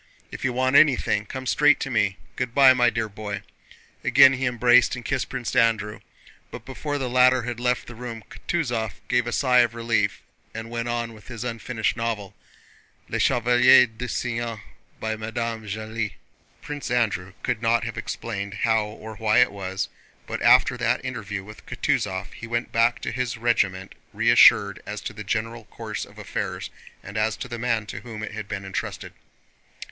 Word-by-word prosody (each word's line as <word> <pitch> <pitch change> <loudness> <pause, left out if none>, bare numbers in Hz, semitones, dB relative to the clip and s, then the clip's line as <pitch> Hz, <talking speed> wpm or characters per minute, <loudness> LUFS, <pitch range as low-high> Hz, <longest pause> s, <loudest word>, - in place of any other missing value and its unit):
If - - -8
you 135 - +1
want 130 +2 +1
anything 130 -8 +4
come 130 +4 -6
straight 150 +3 +4
to 135 - -3
me. 100 -4 +1 0.2
Good 125 -1 -3
by, 135 -2 +8
my 120 -1 +4
dear 115 -1 -2
boy." 100 -1 -6 0.6
Again 135 - +7
he 130 0 -1
embraced 125 0 +4
and 125 - -9
kissed 135 -2 -1
Prince 130 -3 -4
Andrew, 110 -3 +2 0.5
but - - -9
before 145 +2 -4
the 135 -2 -2
latter 125 0 +4
had 120 0 -4
left 125 0 0
the 120 - -10
room 115 -1 -7
Kutúzov 120 -10 -2
gave 125 -1 +1
a - - -2
sigh 125 +1 +3
of 120 -1 +3
relief 115 -4 0 0.3
and 115 +1 -6
went 120 0 -3
on 120 -1 -2
with 105 -2 -16
his 120 -2 -6
unfinished 115 -1 -2
novel, 110 -4 -3 0.8
Les - - -2
Chevaliers 125 +1 +5
du 125 +2 -5
Cygne 115 -2 -3 0.4
by 110 0 -2
Madame 115 +1 -4
de 110 - -13
Genlis. 110 0 -4 0.5
Prince 145 -2 -5
Andrew 100 -7 0
could 120 -3 -1
not 115 0 +2
have 115 -1 -4
explained 100 -3 -5
how 110 -2 +3
or 110 0 -10
why 110 0 +2
it 125 -3 +5
was, 95 -1 -4 0.4
but - - -5
after - - +5
that - - 0
interview 105 -6 -4
with 105 +2 -12
Kutúzov 95 -1 -1
he 115 - -9
went 120 +1 -2
back 115 0 +2
to - - -3
his 125 0 -2
regiment 95 -5 0 0.2
reassured - - +5
as - - -4
to - - -6
the - - -7
general 115 +1 -3
course - - -6
of - - -19
affairs - - -4 0.3
and 100 +3 -7
as 110 -1 0
to - - -6
the 120 -1 -6
man 115 -2 0
to - - -7
whom 110 -3 -8
it - - -5
had 110 -1 -6
been 100 0 -5
entrusted. 95 -1 -5
115 Hz, 185 wpm, -24 LUFS, 110-125 Hz, 0.8 s, by